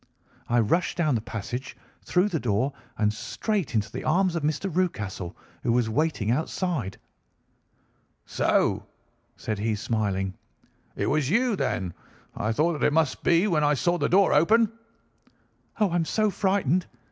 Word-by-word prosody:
I 120 +1 +3
rushed 140 +11 +1
down 155 -5 +2
the 115 - 0
passage, 120 +3 -6 0.3
through 185 +3 +2
the 165 -5 -1
door, 125 +4 0 0.2
and 105 -1 +2
straight 195 - -2
into 105 0 0
the - - -5
arms 180 +2 +2
of 170 - -1
Mr. 155 +6 -1
Rucastle, 105 - -2 0.2
who 120 - 0
was 115 -2 +1
waiting 130 -5 0
outside. 150 - -2 1.3
"'So,' - - +1 0.5
said 110 -2 -3
he, 110 +1 0
smiling, 100 -3 -1 0.6
'it - - -1
was 145 -2 +1
you, 235 +4 +2
then. 90 - -2 0.4
I 110 - -1
thought 155 +6 +1
that - - -2
it 145 - 0
must 155 -4 +1
be 170 +3 +4
when 160 -6 +2
I 145 0 +3
saw 175 +6 +1
the - - +1
door 195 +2 +4
open.' 215 +9 +4 1.1
"'Oh, 205 -4 +3
I - - 0
am 165 - +1
so 215 +4 +1
frightened! 185 -4 +1
150 Hz, 160 wpm, -26 LUFS, 110-180 Hz, 1.3 s, be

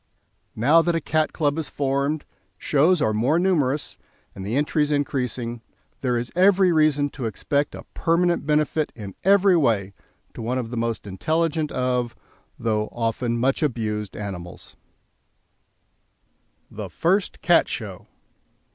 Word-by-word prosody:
Now 145 +9 +5
that 170 0 0
a - - +2
Cat 155 0 0
Club 150 -1 0
is 155 - -3
formed, 140 +2 -1 0.3
shows 155 - +3
are 110 - +1
more 125 +9 +2
numerous, 150 -6 0 0.3
and 95 - -8
the 105 +5 -2
entries 150 +1 +1
increasing, 125 -4 -2 0.4
there 125 -2 +1
is 120 0 -3
every 190 0 +5
reason 155 -3 +3
to 135 -3 -6
expect 140 +6 -1
a - - -9
permanent 170 +1 +1
benefit 150 0 +1
in 100 -4 -8
every 195 0 +5
way 110 - +1 0.4
to - - -8
one 120 +3 -1
of 120 -3 -4
the - - -4
most 115 -1 -2
intelligent 155 - -1
of 125 -2 -1 0.4
(though 110 -2 -1
often 115 +1 -1
much 130 +3 +1
abused) 110 -7 -2
animals. 95 -4 -7 2.0
THE - - -6
FIRST 185 +4 0
CAT - - +5
SHOW. - - -6
140 Hz, 140 wpm, -23 LUFS, 115-155 Hz, 2.0 s, Now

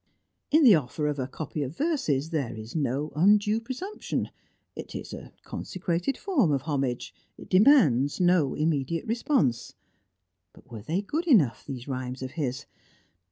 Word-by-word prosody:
In 310 +1 +4
the 240 -6 +8
offer 150 -1 0
of 150 -1 -1
a 130 - -2
copy 150 +2 -5
of 140 +2 -5
verses 165 - 0
there 140 -9 -2
is 110 +4 -9
no 145 0 -1
undue 210 +6 +3
presumption; 260 - -4 0.4
it - - -8
is - - -7
a - - -9
consecrated 180 +7 -3
form 275 - +1
of 140 -2 0
homage; 135 -5 -2 0.2
it - - -13
demands 185 - +5
no 175 -6 +3
immediate 155 +1 -1
response. 220 - 0 0.8
But - - -20
were 110 -3 -7
they 170 - -2
good 320 - -3
enough, 145 - +4
these 130 -2 -7
rhymes 130 -1 -4
of 130 - -5
his? 135 -5 -3
155 Hz, 155 wpm, -27 LUFS, 130-210 Hz, 0.8 s, the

